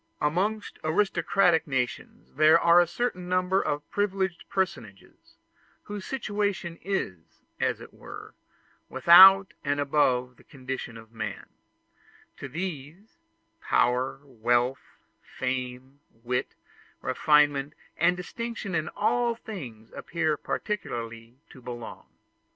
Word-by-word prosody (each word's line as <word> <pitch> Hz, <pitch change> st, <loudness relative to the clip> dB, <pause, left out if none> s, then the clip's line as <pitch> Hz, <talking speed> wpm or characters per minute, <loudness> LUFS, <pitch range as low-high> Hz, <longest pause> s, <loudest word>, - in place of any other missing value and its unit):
Amongst 195 Hz, +8 st, -1 dB
aristocratic 175 Hz, 0 st, +2 dB
nations 130 Hz, -3 st, -4 dB
there 155 Hz, +3 st, +6 dB
are 170 Hz, +1 st, +6 dB
a 175 Hz, -, +1 dB
certain 180 Hz, -1 st, -3 dB
number 185 Hz, +1 st, +2 dB
of 145 Hz, 0 st, -3 dB
privileged 190 Hz, -3 st, -1 dB
personages, 115 Hz, -, -4 dB, 0.5 s
whose 205 Hz, -2 st, -7 dB
situation 205 Hz, -8 st, -2 dB
is, 90 Hz, -, -4 dB, 0.2 s
as -, -, 0 dB
it -, -, -12 dB
were, -, -, -11 dB, 0.6 s
without 190 Hz, +3 st, +8 dB
and 145 Hz, 0 st, 0 dB
above 125 Hz, -4 st, +1 dB
the -, -, -20 dB
condition 130 Hz, -4 st, -7 dB
of 110 Hz, 0 st, -14 dB
man; 110 Hz, -3 st, -5 dB, 0.9 s
to 145 Hz, -, -7 dB
these, 175 Hz, -, -7 dB, 0.4 s
power, 125 Hz, -, +1 dB
wealth, 120 Hz, 0 st, 0 dB, 0.4 s
fame, 130 Hz, +1 st, -5 dB, 0.2 s
wit, 125 Hz, +1 st, -2 dB, 0.5 s
refinement, 145 Hz, -1 st, +2 dB, 0.2 s
and 180 Hz, -, +2 dB
distinction 230 Hz, +1 st, -5 dB
in 155 Hz, -2 st, -1 dB
all 235 Hz, +2 st, +1 dB
things 125 Hz, -, -9 dB
appear 160 Hz, -2 st, -1 dB
peculiarly 115 Hz, -, -5 dB, 0.2 s
to 130 Hz, -, -14 dB
belong. 120 Hz, -1 st, -8 dB
155 Hz, 105 wpm, -27 LUFS, 125-190 Hz, 0.9 s, without